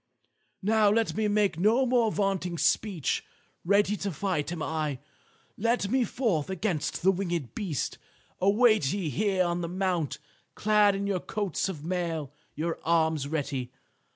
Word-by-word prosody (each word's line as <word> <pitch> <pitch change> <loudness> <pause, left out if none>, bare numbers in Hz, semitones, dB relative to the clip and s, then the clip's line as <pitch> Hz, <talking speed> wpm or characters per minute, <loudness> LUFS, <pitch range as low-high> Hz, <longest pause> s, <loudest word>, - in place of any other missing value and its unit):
"Now 215 0 +4
let 225 +2 +1
me 215 -1 +1
make 205 -5 +1
no 225 +8 +4
more 240 -3 +2
vaunting 195 -4 -1
speech. 185 -4 +1 0.4
Ready 205 +3 +3
to 200 - -3
fight 175 -2 -2
am 165 -3 -4
I. 155 -3 -2 0.6
Let 230 -1 +1
me 260 -2 +3
forth 200 - -1
against 190 -5 -2
the 190 - +6
winged 175 - -3
beast. 170 - -3 0.4
Await 205 - +4
ye 185 -7 -2
here 195 -1 +1
on 175 0 -1
the 170 - -3
mount, 180 -5 -1 0.4
clad 210 -1 +4
in 200 +1 -2
your 200 -2 0
coats 200 -1 -2
of 155 -5 -6
mail, 165 -5 -2 0.2
your 165 +2 -2
arms 160 -3 +2
ready. 140 -5 -3
190 Hz, 150 wpm, -28 LUFS, 160-210 Hz, 0.6 s, the